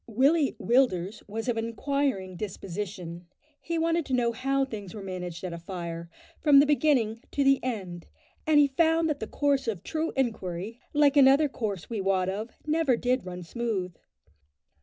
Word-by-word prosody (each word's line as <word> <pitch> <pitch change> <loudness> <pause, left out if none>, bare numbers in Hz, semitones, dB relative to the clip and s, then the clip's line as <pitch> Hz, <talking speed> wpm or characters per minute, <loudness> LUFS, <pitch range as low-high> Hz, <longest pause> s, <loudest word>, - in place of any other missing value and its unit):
Willie 275 +6 +3
Willders 220 -6 +1
was 225 +3 -5
of 240 -2 0
an 225 - -1
enquiring 230 -6 -1
disposition. 180 -3 -6 0.3
He 335 0 -3
wanted 330 +1 +1
to 260 - +1
know 240 -1 +2
how 270 +3 0
things 205 -7 -8
were 205 - -7
managed 180 -2 -6
at 180 -2 -4
a 170 - -6
fire, 170 -2 -6 0.3
from 290 -3 +6
the 285 - +6
beginning 275 -7 +2
to 285 - 0
the 275 0 +3
end, 190 -9 -4 0.4
and 305 -1 +5
he 290 - +7
found 325 +3 +2
that 295 -2 -1
the 220 - -4
course 280 -1 0
of 205 -7 -3
true 320 +1 -2
inquiry, 220 -4 -2
like 290 -1 +4
another 280 +2 +6
course 210 - -4
we 225 -4 -3
wot 190 -1 +1
of, 210 +4 -4 0.2
never 305 -5 +2
did 250 -4 0
run 180 0 -6
smooth. 190 -3 -3
230 Hz, 175 wpm, -27 LUFS, 185-280 Hz, 0.4 s, he